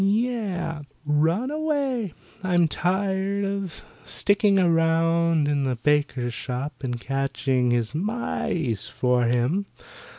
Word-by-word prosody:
"Yeh! 200 -7 0 0.2
Run 165 - +1
away. 280 - -1 0.3
I'm 175 -2 +3
tired 190 +3 0
of 195 -3 -4 0.2
sticking 200 0 +2
around 165 -2 +3
in 145 -1 +1
the 130 -2 0
baker's 135 -2 0
shop 130 +4 -5
and 125 -2 -2
catching 135 -1 0
his 120 -1 0
mice 165 - -1
for 125 -1 +1
him. 125 +12 +1
165 Hz, 105 wpm, -25 LUFS, 135-200 Hz, 0.3 s, I'm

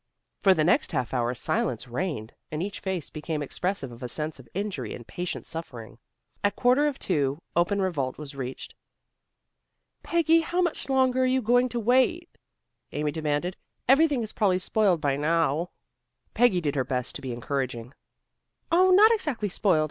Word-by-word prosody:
For 190 -1 +5
the 155 - +2
next 170 - +2
half 125 -1 -1
hour 120 -1 0
silence 120 +2 -1
reigned, 125 - -3 0.2
and 155 +2 -3
each 200 +1 -5
face 185 -6 -3
became 155 -1 -3
expressive 160 -2 -2
of 120 +1 -12
a 125 - -4
sense 150 +2 -3
of 120 -3 -15
injury 195 - -3
and 120 - -11
patient 175 +7 -5
suffering. 120 -9 -7 0.4
At 205 0 +2
quarter 255 +5 +3
of 290 - -2
two, 145 -3 -1
open 190 +4 +2
revolt 140 -9 -2
was 150 -2 -8
reached. 130 -1 -6 1.3
"Peggy, 330 -1 +3
how 345 +2 -2
much 345 -5 -1
longer 260 -1 +3
are 255 - +3
you 260 +1 +2
going 245 +3 +3
to 240 0 -2
wait?" 260 +9 +2 0.6
Amy 150 0 -1
demanded. 155 +4 -2 0.3
"Everything 275 -1 +4
is 215 - -5
probably 195 -4 +2
spoiled 185 -3 +1
by 140 -1 +1
now." 165 +2 +1 0.6
Peggy 225 -6 +3
did 145 -3 -1
her 135 -3 0
best 125 -1 -2
to - - -6
be 130 - -5
encouraging. 125 0 -3 0.8
"Oh, 365 +3 +5
not 410 +5 +7
exactly 290 - 0
spoiled. 180 -3 +2
175 Hz, 170 wpm, -26 LUFS, -, 1.3 s, not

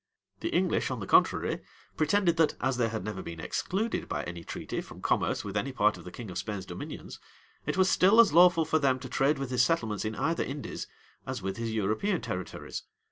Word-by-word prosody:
The - - -2
English, - - +1
on - - -3
the - - -4
contrary, - - +3 0.4
pretended 175 +2 +2
that, 160 -1 +3
as 130 -1 0
they 115 -2 +2
had 110 -3 -4
never 105 -2 -4
been 85 -1 -7
excluded 205 - -2
by - - -2
any 85 -1 -6
treaty - - -4
from - - -12
commerce - - 0
with 100 -1 -6
any 120 +7 0
part 105 -4 +3
of 90 - -12
the 90 - -8
king 110 -2 -8
of 90 - -3
Spain's 100 -1 -4
dominions, 90 -2 -7 0.5
it - - -1
was 190 0 +5
still 195 +4 +5
as 230 -10 +7
lawful 170 -1 +6
for 160 +1 +2
them 135 -3 +3
to 130 0 -8
trade 135 +4 +2
with 135 -2 -4
his 125 - +3
settlements 115 -8 +1
in 110 0 -3
either 165 +1 0
Indies, 140 +1 -5 0.4
as 130 -6 -4
with 95 +2 -3
his 115 -1 -2
European 110 - 0
territories. - - -5
125 Hz, 215 wpm, -29 LUFS, 105-160 Hz, 0.5 s, as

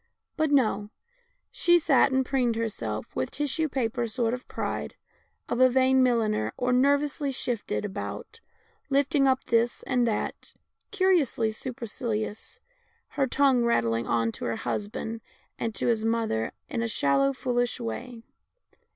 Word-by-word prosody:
But 315 -1 +1
no, 215 -7 +2 0.6
she 345 0 +4
sat 280 -4 +4
and 265 0 +2
preened 250 -3 +1
herself 115 - -4
with 130 - -1
the - - -7
tissue 295 +3 0
paper 240 -3 -1
sort 230 +1 -1
of 250 0 -6
pride - - -4 0.5
of 240 - -2
a 255 0 +7
vain 260 +1 +4
milliner, 220 - +1
or 250 0 +1
nervously 285 +2 +2
shifted 240 -5 -2
about, 205 - -6 0.5
lifting 275 0 +3
up 260 0 +2
this 235 +1 +1
and 250 -2 +1
that, 215 - -3 0.3
curiously 350 - +2
supercilious, 225 -2 -5 0.5
her 275 -2 0
tongue 265 -2 +3
rattling 115 - +1
on 115 -1 +1
to - - -7
her 115 - -1
husband 220 - -4 0.4
and 225 -2 -2
to - - -2
his 225 -2 +1
mother 225 - 0 0.2
in 250 -7 -3
a 230 - 0
shallow, 140 -9 +2
fool 245 - -2
ish 245 +1 0
way. 235 0 -6
240 Hz, 145 wpm, -27 LUFS, 220-265 Hz, 0.6 s, a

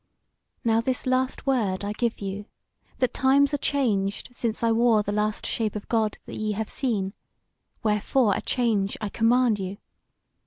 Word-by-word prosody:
Now 225 -1 +3
this 255 +2 -1
last 255 0 0
word 215 -9 +1
I 205 - -2
give 235 0 -2
you, 200 +1 -4 0.5
that 255 -2 +1
times 275 +2 +3
are - - +2
changed 210 -10 0
since 235 -2 -3
I 230 - +3
wore 225 -2 +4
the 205 - -2
last 210 0 -1
shape 220 -2 -1
of 210 - -6
God 220 -2 +1
that - - -8
ye 215 -1 -1
have 215 +1 -3
seen, 205 -7 -1 0.7
wherefore 215 +1 +2
a - - -2
change 220 -6 0
I 210 - -3
command 230 0 +3
you. 190 +1 -4
225 Hz, 165 wpm, -25 LUFS, 205-250 Hz, 0.7 s, wore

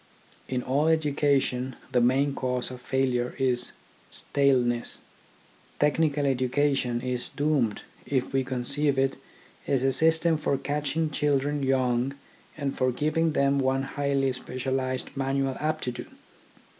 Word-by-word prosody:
In 125 -1 -2
all 140 +4 +1
education 140 -5 +1 0.2
the 125 -2 +3
main 135 +4 +3
cause 125 -2 -2
of 125 -1 -9
failure 130 -2 0
is 125 -2 0 0.4
staleness. 125 -4 +1 0.8
Technical 150 -1 +2
education 130 -1 +1
is 125 -1 -3
doomed 140 -8 0 0.2
if 130 -1 -1
we 135 0 +2
conceive 135 +3 0
it 135 0 +2 0.5
as 135 -2 +1
a 135 - +3
system 160 +3 +4
for 140 -2 0
catching 150 +3 -1
children 145 0 0
young 130 0 +1 0.4
and 140 -2 -2
for 130 -1 +1
giving 155 +5 0
them 140 0 +2
one 135 0 +1
highly 140 -1 0
specialised 130 +1 -3
manual 135 -1 0
aptitude. 155 -5 -3
135 Hz, 120 wpm, -27 LUFS, 130-145 Hz, 0.8 s, system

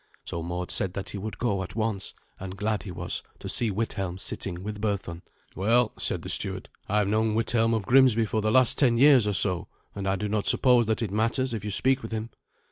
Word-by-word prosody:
So 85 - -4
Mord 90 +2 -4
said 95 -3 +1
that 100 0 -5
he 100 - -5
would 110 +2 -6
go 105 -6 -1
at 95 - -7
once; 110 -3 -3 0.2
and 95 0 -7
glad 105 +1 -1
he 95 - -8
was 90 0 -4 0.2
to - - -8
see 120 - +1
Withelm 95 -3 -3
sitting 95 -2 -4
with 105 0 -6
Berthun, 100 -5 -3 0.3
"Well," 115 +4 +2
said - - -2
the - - -7
steward, - - -2 0.2
"I 105 - +1
have 105 -2 +2
known 110 +1 +1
Withelm 115 0 +2
of 110 -3 -3
Grimsby 125 -2 +5
for 110 +1 -1
the 110 +1 0
last 130 0 +4
ten 120 -5 +3
years 130 -4 +6
or 105 - 0
so, 90 -2 -1 0.3
and 100 -1 -5
I 95 - +1
do 105 +2 -3
not 105 0 0
suppose 125 -4 +5
that 110 +2 0
it 105 - -3
matters 115 +4 0
if 110 -3 -4
you 105 - -4
speak 130 +6 +3
with 110 - -8
him." 110 +1 -4
105 Hz, 230 wpm, -26 LUFS, 95-115 Hz, 0.3 s, years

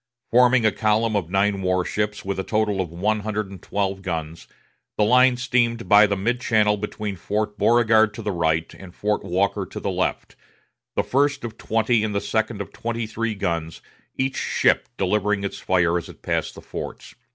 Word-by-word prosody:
Forming 125 0 +5
a 110 - +5
column 110 +1 +1
of 90 -5 -1
nine 100 +1 +1
war 90 -1 +1
ships 105 -1 -2
with 100 0 -2
a - - -1
total 105 -2 0
of 90 - -4
one 105 +6 0
hundred 105 -1 -3
and 95 - -10
twelve 100 -1 -2
guns, 80 -3 -5 0.5
the 105 - +3
line 125 +3 +5
steamed 120 -2 0
by 105 0 +7
the 100 -1 -1
mid 120 +5 -1
channel 105 -3 +3
between 105 0 -4
Fort 105 +3 -2
Beauregard 110 -2 +4
to - - -7
the 105 - -1
right, 80 -2 0
and 95 -2 -13
Fort 105 0 -1
Walker 95 +2 0
to - - -7
the - - -2
left, - - -2 0.6
the - - +1
first 140 +1 +1
of 115 -2 -6
twenty 115 0 +1
and 105 -2 -2
the - - +2
second 110 +1 -1
of - - -8
twenty 115 0 -3
three 110 0 -3
guns, 85 -5 -3 0.3
each 130 0 -1
ship - - +1
delivering 105 +1 0
its 100 - -4
fire 90 -2 +2
as - - -10
it - - -14
passed - - -2
the - - -10
forts. - - -7
105 Hz, 195 wpm, -23 LUFS, 95-115 Hz, 0.6 s, by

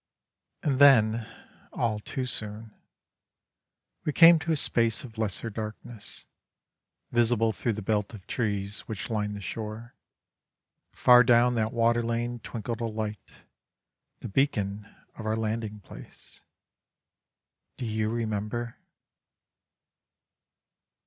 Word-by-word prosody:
And 135 -3 +1
then, 115 -5 +6 0.4
all 110 -3 -1
too 130 +5 -4
soon, 110 -2 -4 1.3
we 150 - 0
came 165 +2 +8
to 160 +2 -2
a - - +3
space 115 -6 +1
of 115 -4 -10
lesser 110 +1 -2
darkness, 110 +1 -7 0.9
visible 115 -1 +3
through 115 +1 -1
the 105 0 -6
belt 105 0 0
of 95 - -13
trees 100 -3 -2
which 110 +1 -5
lined 105 -1 -1
the 100 - -7
shore; 110 +3 -6 1.0
far 125 0 +6
down 120 +1 +4
that 110 -1 0
water 120 0 +2
lane 120 +1 -2
twinkled 115 +1 -5
a - - 0
light, 110 -3 -6 0.8
the - - -5
beacon 105 -4 0 0.3
of 110 - -5
our 110 +1 0
landing 110 -1 -3
place. - - -11 1.4
Do 125 - -4
you 110 -1 -1
remember? 115 +1 -3
115 Hz, 115 wpm, -28 LUFS, 105-120 Hz, 1.4 s, came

